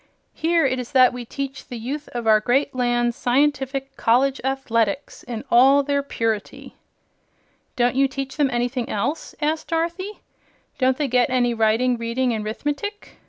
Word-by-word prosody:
"Here 335 -1 +2
it 255 -1 0
is 250 +3 -7
that 255 -2 +6
we 245 -1 -6
teach 275 +2 -6
the 245 - -6
youth 275 +6 -5
of 240 -1 -3
our 215 -1 +5
great 265 +6 +1
land 240 -1 +1
scientific 270 +1 0
College 265 +4 +2
Athletics 265 -2 -1
in 235 -3 -6
all 270 +4 +6
their 280 0 0
purity." 225 -6 -3 1.0
"Don't 245 0 +2
you 270 +1 +3
teach 270 0 -5
them 290 -3 +2
anything 245 0 -2
else?" 285 +10 -3
asked 310 +1 -1
Dorothy. 340 +5 -3 0.6
"Don't 260 -1 +2
they 295 - 0
get 250 -1 +2
any 245 -2 +2
reading, 230 +2 +2
writing 235 +2 0
and 215 -1 -3
'rithmetic?" 295 - -5
255 Hz, 160 wpm, -22 LUFS, 240-280 Hz, 1.0 s, that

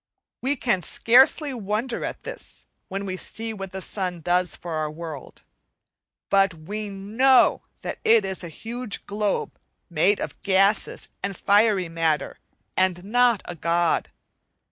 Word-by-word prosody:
We 270 +3 +1
can 235 -8 +1
scarcely 265 - +4
wonder 225 +2 -2
at - - -5
this - - -4 0.2
when 195 +1 -4
we 185 -1 -4
see 225 +4 -4
what 195 -3 -7
the 190 0 -6
sun 180 -3 -3
does 180 +1 +2
for 175 - -8
our 155 -1 -1
world; 155 -3 -8 0.9
but 195 -2 +4
we 205 +7 -5
know 220 +7 +3 0.2
that - - -5
it 225 -2 +5
is 190 -1 -3
a 170 - -6
huge 230 +5 -6
globe 205 0 -2 0.3
made 180 +6 +3
of - - -6
gases 195 +2 +2
and 200 -2 -3
fiery 205 -2 +3
matter 165 -3 -1 0.4
and 185 -1 +1
not 240 +1 +3
a 175 - -5
god. 170 +1 +1
195 Hz, 145 wpm, -24 LUFS, 175-220 Hz, 0.9 s, it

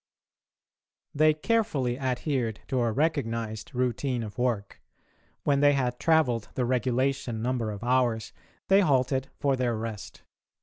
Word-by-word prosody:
They 155 +1 +4
carefully 155 - 0
adhered 130 -3 -1
to 130 -2 +1
a 115 -1 +1
recognised 115 -7 -2
routine 125 0 -1
of 105 +1 -8
work. 115 -5 -1 0.6
When 140 -1 +2
they 145 0 +5
had 125 -3 -1
travelled 135 -9 +2
the 125 - 0
regulation 125 -1 0
number 120 -3 -1
of 105 +1 -6
hours 120 -3 +1 0.3
they 195 +1 +5
halted 135 -4 +1
for 140 -1 +2
their 125 -3 0
rest. 110 -2 -7
125 Hz, 130 wpm, -27 LUFS, 115-140 Hz, 0.6 s, they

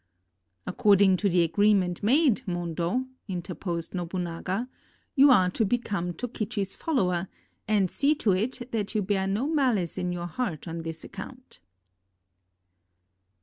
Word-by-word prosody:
"According 200 -3 +4
to 200 +2 +1
the 175 -1 +3
agreement 185 +1 +2
made, 260 +2 +3
Mondo," 175 +6 -1 0.2
inter 180 -2 -4
posed 170 -2 -4
Nobunaga, 180 +4 -3 0.5
"you 280 0 +6
are 185 -8 +5
to 225 - +1
become 200 -5 -1
Tokichi 215 -2 -3
's 195 - -6
follower, 190 - 0 0.4
and 200 -4 +2
see 290 +2 +2
to 220 -8 +1
it 240 +6 -2
that 215 -1 -2
you 210 - +2
bear 190 0 0
no 205 +7 0
malice 255 - +1
in 180 0 -1
your 175 -1 -4
heart 175 - -4
on 165 0 -4
this 165 0 -6
account." 250 +6 -10
195 Hz, 140 wpm, -27 LUFS, 175-235 Hz, 0.5 s, you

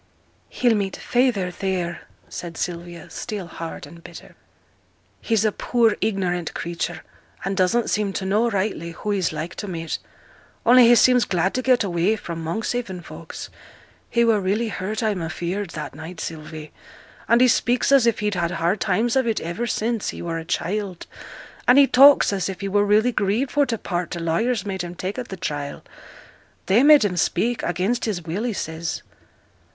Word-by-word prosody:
'He'll 245 -2 +2
meet 200 -3 -1
feyther 240 -8 +1
theere,' 180 -2 -3 0.2
said 170 -2 -7
Sylvia, 175 -1 -5
still 205 -4 -5
hard 165 -1 -7
and 170 0 -14
bitter. - - -12 0.9
'He's 225 -2 +1
a 215 - +3
poor 230 0 +2
ignorant 185 -5 -1
creature, 170 -1 -4 0.4
and 195 0 -1
doesn't 195 +5 +2
seem 210 -2 0
to 190 - -3
know 215 +5 +2
rightly 190 -5 -2
who 210 +5 -4
he's 195 -4 0
like 155 +3 -5
to 205 - -6
meet; 165 -3 -4 0.7
only 245 0 +7
he 240 - +7
seems 250 0 +5
glad 185 +1 0
to 255 - -1
get 255 -2 +3
away 180 +2 +1
fra' 170 -5 -6
Monkshaven 185 +4 -3
folks; - - -9 0.6
he 235 0 +3
were 220 -3 +3
really 210 +5 0
hurt, 210 +3 -3
I 220 - +2
am 190 -4 -3
afeared, 175 +4 -3
that 150 -1 -5
night, 160 +4 -9
Sylvie, 155 -1 -7 0.6
and 235 - +5
he 255 - +6
speaks 245 +2 +2
as 270 -4 +6
if 230 -2 +1
he'd 210 0 0
had 170 -2 0
hard 175 +4 0
times 220 +5 +1
of 260 -2 +2
it 225 - +1
ever 170 +9 -3
since 225 0 -1
he - - -6
were 165 -1 -3
a 165 - -8
child, 190 +1 -3 0.6
and 250 - +7
he 280 - +8
talks 275 -3 +6
as 190 -1 -1
if 190 - -6
he 200 - -2
were 205 +1 +2
really 215 +4 +3
grieved 215 +5 0
for 290 -1 +2
t' 230 -2 -1
part 175 -4 -3
t' - - -5
lawyers 185 +7 0
made 190 -2 -3
him 175 0 -6
take 190 +7 -4
at 245 - -6
th' 190 - -7
trial, 145 -5 -4 0.8
they 205 +6 +4
made 290 -4 +7
him 185 -3 -1
speak, 230 +8 +1
against 190 +8 -1
his 195 -6 -2
will, 170 +5 -3
he 245 - 0
says.' 160 -2 -4
195 Hz, 185 wpm, -23 LUFS, 175-230 Hz, 0.9 s, he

